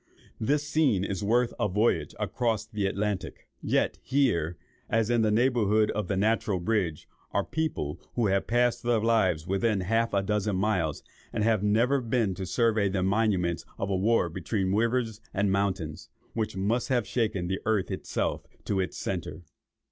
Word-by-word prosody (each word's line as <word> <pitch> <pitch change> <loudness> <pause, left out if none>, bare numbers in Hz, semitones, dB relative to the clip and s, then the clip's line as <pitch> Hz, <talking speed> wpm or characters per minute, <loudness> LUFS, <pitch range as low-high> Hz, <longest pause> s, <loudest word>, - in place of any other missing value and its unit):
This 145 +6 0
scene 140 -12 +2
is 100 0 -3
worth 120 +3 +2
a - - +2
voyage 105 +5 +1
across 115 -4 -1
the 105 -3 -2
Atlantic; 100 0 -3
yet - - 0
here, 90 - +1 0.3
as 115 0 +1
in 120 -1 +3
the 110 - +3
neighbourhood 110 -2 +3
of 105 -3 -2
the 95 - -1
Natural 105 -1 +1
Bridge, 90 -4 -1 0.3
are - - +2
people 155 - -3
who 120 - +1
have 100 -1 +1
passed 120 0 +2
their 120 -1 +2
lives 105 -8 +2
within 100 +2 +1
half 115 +5 +1
a 100 - +2
dozen 105 0 0
miles, 95 -6 0 0.3
and 105 - -1
have 110 -2 +2
never 115 +7 +2
been 115 -4 0
to 95 0 -5
survey 110 +1 +2
these 95 -1 -1
monuments 95 -4 +1
of 100 - -2
a - - +2
war 105 0 +2
between 95 +3 -2
rivers 115 0 0
and 100 0 +2
mountains, 95 -6 -2 0.2
which 110 -4 -2
must 110 +6 0
have 120 -4 +1
shaken 105 -5 -1
the 95 +1 -2
earth 110 -4 +1
itself - - -2 0.2
to 100 - 0
its 90 -2 -2
centre." 90 - -4
105 Hz, 170 wpm, -28 LUFS, 95-115 Hz, 0.3 s, in